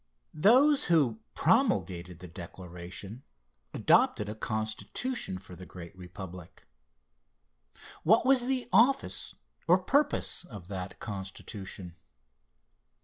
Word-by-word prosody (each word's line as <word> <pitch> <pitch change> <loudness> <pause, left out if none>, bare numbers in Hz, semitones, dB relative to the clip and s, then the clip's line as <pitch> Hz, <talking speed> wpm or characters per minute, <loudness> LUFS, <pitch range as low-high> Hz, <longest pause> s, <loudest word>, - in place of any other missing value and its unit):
Those 260 - +5
who 140 -10 +3 0.2
promulgated 90 -1 +1
the 90 +1 -10
Declaration 90 +4 -8 0.5
adopted 105 - +3
a - - -3
Constitution 110 - -2
for 90 -1 -11
the 90 +1 -11
great 85 0 -10
Republic. 90 -1 -10 1.4
What 220 +8 +4
was 255 -2 +4
the 260 -2 -1
office 250 +7 +3 0.3
or 175 +2 +7
purpose 280 +9 +1
of 100 - -11
that 95 -1 -5
Constitution? 95 -2 -7
105 Hz, 95 wpm, -30 LUFS, -, 1.4 s, or